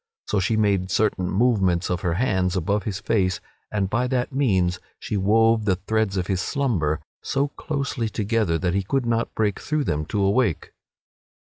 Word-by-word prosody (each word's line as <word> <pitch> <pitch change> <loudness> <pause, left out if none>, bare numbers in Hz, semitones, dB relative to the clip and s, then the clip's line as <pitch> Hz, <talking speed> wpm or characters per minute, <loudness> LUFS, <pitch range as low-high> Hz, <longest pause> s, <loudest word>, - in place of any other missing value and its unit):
So 105 - 0
she 110 +4 +1
made 100 -3 +1
certain 95 -4 +1
movements 95 -6 +2
of 90 - -1
her 85 -2 0
hands 95 -4 +1
above 100 +3 0
his 100 -3 -3
face 95 -4 0 0.3
and 100 -2 0
by 120 +6 0
that 125 +1 -1
means 95 -10 +1 0.2
she - - -4
wove 110 +3 +3
the 95 -3 +3
threads 100 +1 -1
of 90 - 0
his 95 0 -1
slumber 95 - 0 0.2
so 140 +1 0
closely 140 -6 -3
together 105 -5 0
that 90 0 -1
he 100 - +1
could 125 +7 -1
not 115 0 -1
break 105 -3 0
through 155 -1 -1
them 75 - -2
to 105 - -2
awake. 100 - +1
105 Hz, 175 wpm, -24 LUFS, 95-115 Hz, 0.3 s, wove